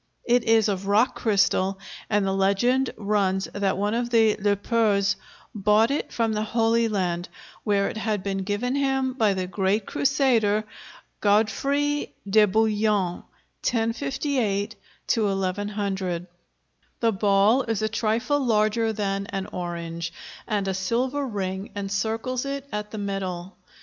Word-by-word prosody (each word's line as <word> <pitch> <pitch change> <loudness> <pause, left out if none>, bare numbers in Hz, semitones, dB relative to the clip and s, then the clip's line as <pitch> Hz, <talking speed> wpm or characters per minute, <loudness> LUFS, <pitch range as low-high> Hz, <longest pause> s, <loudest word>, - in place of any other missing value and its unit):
It 245 -1 +3
is 225 -1 +4
of 195 -1 -2
rock 215 +5 +3
crystal, 195 -3 +1 0.3
and 205 -2 +2
the 195 - 0
legend 220 +7 +2
runs 200 -2 0
that 200 -2 0
one 205 +2 0
of 240 +1 -1
the 225 -2 +4
Le 205 0 +2
Poers 205 -2 +1 0.4
brought 210 +3 +3
it 285 - -2
from 225 -2 0
the 210 - -1
Holy 230 +1 +2
Land, 180 -4 -1 0.3
where 200 -1 +2
it - - -5
had 215 -3 -1
been 195 -1 -2
given 205 +6 -1
him 270 -2 +1
by 220 -6 +2
the 185 -1 -2
great 195 +3 0
crusader 240 -7 +2 0.6
Godefroy 275 +8 +1 0.2
de 210 +2 +5
Bouillon 210 -3 +1 0.4
(1058 235 -3 -1 0.3
1100). 195 -3 -1 0.7
The 230 -1 +3
ball 205 +4 +3
is 225 -4 -2
a - - +2
trifle 225 +6 0
larger 220 -1 +2
than 200 -2 -2
an 195 -1 -3
orange 170 -1 -4 0.3
and 205 -3 -1
a 190 - 0
silver 250 +9 -1
ring 195 -2 -3
encircles 220 +5 -2
it 275 0 -4
at 210 0 -3
the 215 - -7
middle. 190 -3 -4
210 Hz, 135 wpm, -25 LUFS, 195-230 Hz, 0.7 s, de